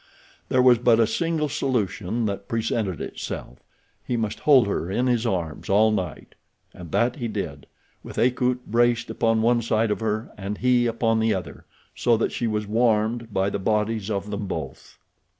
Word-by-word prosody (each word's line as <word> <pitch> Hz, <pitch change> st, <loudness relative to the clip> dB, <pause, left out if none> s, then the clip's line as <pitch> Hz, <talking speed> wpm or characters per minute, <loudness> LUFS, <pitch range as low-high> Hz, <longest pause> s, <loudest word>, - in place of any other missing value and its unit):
There 130 Hz, -1 st, +3 dB
was 125 Hz, -2 st, +6 dB
but 120 Hz, -1 st, +4 dB
a 115 Hz, -, +5 dB
single 155 Hz, +6 st, -1 dB
solution 115 Hz, -5 st, -1 dB
that 100 Hz, -1 st, -4 dB
presented 110 Hz, -6 st, -1 dB
itself—he 90 Hz, -, -7 dB
must 110 Hz, -2 st, -2 dB
hold 135 Hz, -6 st, +5 dB
her 95 Hz, -3 st, -2 dB
in 120 Hz, +6 st, 0 dB
his 120 Hz, -2 st, +1 dB
arms 85 Hz, -8 st, -3 dB
all 110 Hz, +3 st, +4 dB
night. 90 Hz, -7 st, -4 dB, 0.4 s
And 85 Hz, -3 st, -10 dB
that 120 Hz, +3 st, +1 dB
he 120 Hz, -4 st, -3 dB
did, 80 Hz, -10 st, -5 dB, 0.4 s
with -, -, -10 dB
Akut 125 Hz, 0 st, +1 dB
braced 120 Hz, +1 st, +1 dB
upon 115 Hz, -1 st, +1 dB
one 120 Hz, +1 st, +3 dB
side 110 Hz, -1 st, +1 dB
of -, -, -1 dB
her 110 Hz, 0 st, -2 dB
and 100 Hz, +1 st, -4 dB
he 125 Hz, -1 st, +3 dB
upon 115 Hz, -1 st, +1 dB
the 110 Hz, -1 st, +2 dB
other, 90 Hz, -3 st, -7 dB, 0.3 s
so 120 Hz, -2 st, +2 dB
that 115 Hz, -, 0 dB
she 120 Hz, -, -2 dB
was 105 Hz, -1 st, -1 dB
warmed 115 Hz, +1 st, +1 dB
by 95 Hz, 0 st, 0 dB
the 100 Hz, -, -2 dB
bodies 105 Hz, +1 st, 0 dB
of 100 Hz, 0 st, -3 dB
them 100 Hz, -1 st, -3 dB
both. 80 Hz, -7 st, -7 dB
110 Hz, 175 wpm, -24 LUFS, 100-120 Hz, 0.4 s, was